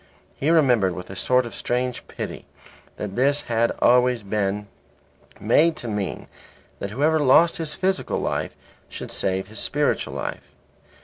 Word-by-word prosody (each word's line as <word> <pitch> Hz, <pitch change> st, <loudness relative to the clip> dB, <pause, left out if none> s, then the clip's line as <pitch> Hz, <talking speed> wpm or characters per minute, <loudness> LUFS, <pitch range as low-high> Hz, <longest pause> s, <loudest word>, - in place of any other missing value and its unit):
He 145 Hz, -, -1 dB
remembered 125 Hz, -, +4 dB
with 90 Hz, +1 st, -8 dB
a -, -, -7 dB
sort 125 Hz, +5 st, +2 dB
of 120 Hz, -, -8 dB
strange 125 Hz, 0 st, -2 dB
pity -, -, -7 dB, 0.5 s
that 100 Hz, -2 st, -5 dB
this 140 Hz, +3 st, +2 dB
had 115 Hz, 0 st, +1 dB
always 125 Hz, -1 st, +4 dB
been 105 Hz, 0 st, -1 dB, 0.7 s
made 165 Hz, +1 st, +3 dB
to 120 Hz, -, -7 dB
mean 105 Hz, -4 st, -3 dB, 0.5 s
that 100 Hz, -, -4 dB
whoever 150 Hz, +8 st, +2 dB
lost 150 Hz, +4 st, +5 dB
his 160 Hz, -2 st, -3 dB
physical 190 Hz, 0 st, -1 dB
life -, -, -2 dB, 0.3 s
should -, -, -7 dB
save 95 Hz, 0 st, -1 dB
his 110 Hz, -, -5 dB
spiritual 145 Hz, 0 st, 0 dB
life. -, -, -6 dB
125 Hz, 145 wpm, -23 LUFS, 105-145 Hz, 0.7 s, lost